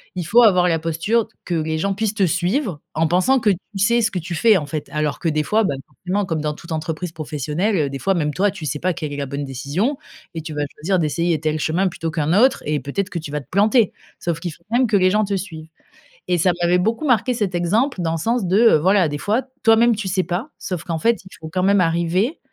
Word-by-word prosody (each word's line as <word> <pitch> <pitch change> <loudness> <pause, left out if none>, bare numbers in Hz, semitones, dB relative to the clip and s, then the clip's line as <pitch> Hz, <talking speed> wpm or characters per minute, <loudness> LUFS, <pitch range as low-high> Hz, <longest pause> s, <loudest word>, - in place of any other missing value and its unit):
il 180 - -2
faut 235 +9 +5
avoir 185 -6 +5
la 165 -2 +1
posture 165 +8 0
d - - -32
que 180 - -3
les 160 0 -1
gens 195 +5 0
puissent 215 +1 -2
te 195 - +3
suivre, 180 - -1
en 160 +1 +2
pensant 185 +11 +3
que 220 -3 +3
tu 195 +2 -6
sais 235 +4 +3
ce 225 - +2
que 185 - -2
tu 170 +1 -6
fais, 220 +4 +5
en 155 - -3
fait. 150 0 -5
Alors, 150 -1 -1
que 170 - 0
des 155 -1 0
fois, 220 +7 +2
bah, 145 -9 0
forcément, 195 +3 -3
comme 160 -3 -2
dans 150 0 -1
toute 170 +2 -12
entreprise 160 +2 -3
professionnelle, 155 +6 -2
heu, 145 -3 +1
des 135 - -5
fois, 195 0 +1
même 150 -3 -1
toi, 200 +5 +2
tu 180 -5 -8
sais 150 +1 -2
pas 185 +3 0
quelle 155 -3 -5
est - - -5
la 140 - -2
bonne 140 +1 -4
décision 145 - -2 0.4
et 165 - -4
tu 155 0 -7
vas 150 - -1
choisir 185 +5 0
d'essayer 165 +1 0
tel 155 0 -1
chemin 175 +6 +1
plutôt 165 -2 -4
qu'un 155 0 0
autre 245 +7 +4
et 150 0 0
peut-être 165 +9 -3
que 170 - -3
tu 155 -2 -8
vas 150 0 -2
te - - -19
planter. 210 +3 +3 0.3
Sauf 170 -2 -2
qu'il 175 0 -4
faut - - -21
quand 235 - +2
même 255 - +3
que 210 - +3
les 185 0 +3
gens 215 +1 +2
te 200 0 -1
suivent. 160 -4 -8 0.6
Et 180 - +2
ça 180 +3 +3
m'avait 175 +1 +3
beaucoup 225 +11 0
marquée 250 -1 +2
cet 205 -5 -2
exemple, 200 +8 +1
dans 165 -1 0
le 165 - -1
sens 230 +3 0
de, 185 +3 +2
heu, 230 -8 +6
voilà, 185 +2 +3
des 145 0 -4
fois, 215 - 0 0.2
toi-même, 230 0 +5
tu 210 - -4
sais 185 0 +1
pas, 185 - -3
sauf 180 -3 -5
qu'en 165 -2 -2
fait, 230 +7 +1
il 190 - -14
faut 160 - -7
quand 185 +2 -1
même 200 0 +4
arriver 170 - +1
180 Hz, 270 wpm, -20 LUFS, 155-205 Hz, 0.6 s, heu